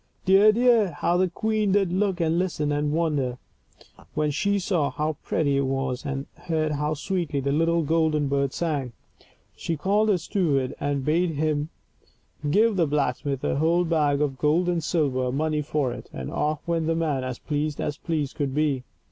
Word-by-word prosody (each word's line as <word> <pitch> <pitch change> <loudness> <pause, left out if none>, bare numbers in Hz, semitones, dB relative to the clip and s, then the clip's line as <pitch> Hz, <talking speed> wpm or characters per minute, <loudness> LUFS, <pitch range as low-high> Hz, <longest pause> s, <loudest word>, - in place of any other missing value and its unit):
Dear, 195 +3 +6
dear, 230 -5 +3
how 170 +4 0
the 185 0 +2
queen 215 +2 0
did 195 -3 +2
look 190 -1 0
and 165 0 +1
listen 160 -5 -1
and 145 0 0
wonder, 150 -6 0 0.8
when 150 -1 +1
she 200 +7 +1
saw 175 -6 0
how 155 0 -2
pretty 140 -3 0
it 140 -1 +1
was, 135 0 -2
and 140 0 -3
heard 155 -2 -1
how 150 +1 -1
sweetly 165 -2 -2
the 140 +1 -1
little 165 +3 +2
golden 155 -1 +1
bird 140 -1 0
sang. 145 -8 -2 0.6
She 165 - -3
called 205 +7 +2
her 200 - +4
steward 155 -7 0
and 140 -2 -1
bade 165 +1 +1
him 150 0 0 0.8
give 215 +5 +3
the 170 -3 +3
blacksmith 140 -1 -1
a - - 0
whole 170 +4 +2
bag 150 -4 +1
of 135 -3 -1
gold 160 +4 +2
and 175 -2 0
silver 135 -6 0
money 150 +2 0
for 145 -3 -1
it, - - -10
and 65 0 -6
off 150 +2 -2
went 165 -2 0
the 165 - +1
man 150 -5 0
as 130 -1 -4
pleased 150 0 -2
as 150 0 -2
pleased 155 -5 -2
could 140 -2 -2
be. 145 -4 +1
155 Hz, 180 wpm, -25 LUFS, 140-170 Hz, 0.8 s, Dear